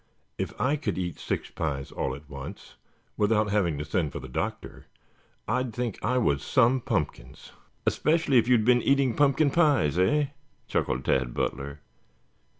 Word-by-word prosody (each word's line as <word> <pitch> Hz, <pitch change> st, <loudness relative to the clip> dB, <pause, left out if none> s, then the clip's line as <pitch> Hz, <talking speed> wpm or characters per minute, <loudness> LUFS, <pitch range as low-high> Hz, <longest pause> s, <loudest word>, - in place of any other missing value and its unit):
"If -, -, -4 dB
I 140 Hz, +4 st, +2 dB
could 150 Hz, -, -3 dB
eat 90 Hz, -2 st, -3 dB
six -, -, -3 dB
pies 70 Hz, -4 st, -3 dB
all 65 Hz, -, -2 dB
at 70 Hz, +2 st, -13 dB
once, 70 Hz, +8 st, -9 dB, 0.4 s
without 105 Hz, 0 st, +2 dB
having 90 Hz, -7 st, +1 dB
to 75 Hz, -, -4 dB
send 75 Hz, -1 st, -1 dB
for -, -, -4 dB
the -, -, -8 dB
doctor, 60 Hz, -, -5 dB, 0.6 s
I'd 125 Hz, 0 st, -1 dB
think 120 Hz, -4 st, -3 dB
I 125 Hz, +4 st, +1 dB
was 70 Hz, -, +2 dB
some 130 Hz, +7 st, +3 dB
pumpkins." 70 Hz, -, -4 dB, 0.3 s
"Especially 155 Hz, -4 st, +3 dB
if 115 Hz, -, 0 dB
you 125 Hz, -, +5 dB
had 110 Hz, -2 st, +1 dB
been 125 Hz, 0 st, +5 dB
eating 140 Hz, -3 st, +2 dB
pumpkin 145 Hz, 0 st, +3 dB
pies, 140 Hz, -, +3 dB
eh?" 140 Hz, +10 st, +2 dB, 0.4 s
chuckled 65 Hz, 0 st, -1 dB
Tad 65 Hz, -2 st, +1 dB
Butler. 70 Hz, +2 st, -3 dB
105 Hz, 160 wpm, -27 LUFS, -, 0.6 s, you